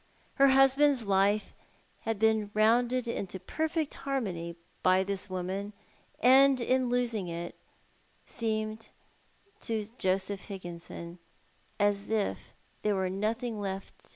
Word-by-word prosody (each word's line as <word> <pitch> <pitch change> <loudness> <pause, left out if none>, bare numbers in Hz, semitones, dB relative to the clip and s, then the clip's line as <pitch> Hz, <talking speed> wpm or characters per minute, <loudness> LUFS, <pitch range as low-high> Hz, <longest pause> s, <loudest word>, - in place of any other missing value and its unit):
Her 275 - +7
husband's 270 0 +5
life 200 +2 +2 0.5
had 225 -1 -2
been 220 -1 +2
rounded 240 +3 +3
into 195 -5 -4
perfect 315 - -2
harmony 185 -12 -3 0.3
by 185 +1 +4
this 195 0 -3
woman: 190 +3 -3 0.5
and 265 +1 +6
in 255 +1 +1
osing 235 -6 0
her 170 +1 -4
It - - -19 0.7
seemed 220 -1 -3 0.7
to 220 -2 -2
Joseph 190 0 -1
Higginson 175 -2 -8 0.6
as 205 0 +1
if 220 -2 -2 0.3
there 210 -1 +1
were 190 -1 0
nothing 220 +3 -2
left 195 -1 -6
215 Hz, 115 wpm, -30 LUFS, 190-245 Hz, 0.7 s, Her